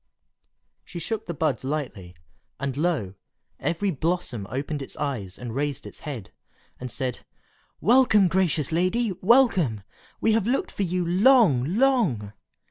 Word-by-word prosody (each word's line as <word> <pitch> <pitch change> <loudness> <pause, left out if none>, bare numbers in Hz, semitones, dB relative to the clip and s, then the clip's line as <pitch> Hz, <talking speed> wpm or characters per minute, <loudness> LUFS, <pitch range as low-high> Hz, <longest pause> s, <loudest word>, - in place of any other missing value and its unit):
She - - -10
shook 215 +6 -4
the 170 - -3
buds 145 -6 0
lightly, 130 -11 -4 0.4
and 135 -2 -3
lo! 150 - -1 0.5
every 170 +7 -1
blossom 155 - -2
opened 140 +3 -3
its 135 - -8
eyes 120 -11 -4
and 120 -2 -6
raised 140 +1 -2
its - - -10
head, 130 - -7 0.5
and 125 - -5
said, 130 -1 -3 0.6
"Welcome, 225 -4 +5
gracious 175 -5 +1
lady! 185 +7 +1
welcome! 185 - +3 0.4
We 225 - +2
have 220 -1 +1
looked 260 +3 0
for - - -5
you 180 -1 0
long, 185 - +4
long!" 210 - +2
160 Hz, 135 wpm, -25 LUFS, 130-200 Hz, 0.6 s, Welcome